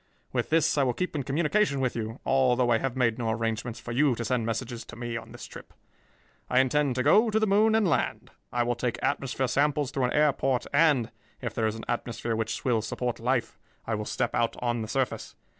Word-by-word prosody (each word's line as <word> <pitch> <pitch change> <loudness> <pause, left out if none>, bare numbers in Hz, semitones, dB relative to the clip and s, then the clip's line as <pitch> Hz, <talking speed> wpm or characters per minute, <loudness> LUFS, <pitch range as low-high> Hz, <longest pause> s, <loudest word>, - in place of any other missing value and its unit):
With - - -1
this 160 -2 +3
I - - +4
will 125 -2 0
keep 180 -3 -3
in 145 - 0
communication 150 +3 +1
with 130 -2 0
you, 115 0 -4
although 125 -2 +3
I 115 - +4
have 135 0 -2
made 120 -2 +1
no 115 -2 -1
arrangements 115 +1 -2
for 120 - -7
you 135 +1 +3
to 115 - -4
send 120 -3 0
messages 120 +1 -3
to - - -10
me 120 -1 -5
on 115 - -7
this - - -9
trip. - - -12 0.7
I 125 - +4
intend 135 0 +2
to 125 - 0
go 215 - +5
to 220 0 +2
the 220 - +2
moon 215 +2 +4
and 220 -3 +3
land. 165 - -1 0.2
I 120 0 +1
will 120 0 0
take 120 0 -2
atmosphere 135 -2 0
samples 140 +2 +1
through 135 -2 0
an 125 - -1
air 150 -1 +4
port 130 -2 0
and, 145 -8 +3 0.3
if - - -4
there 110 -1 0
is 110 - -2
an 115 - -8
atmosphere 120 -1 -2
which 110 0 -3
will 120 -4 +2
support 120 +2 -3
life, 120 0 -1 0.3
I 115 - -2
will 105 0 -2
step - - -2
out 115 0 +1
on 120 -1 -1
the 110 - -4
surface. 130 +2 -2
125 Hz, 230 wpm, -27 LUFS, 115-140 Hz, 0.7 s, go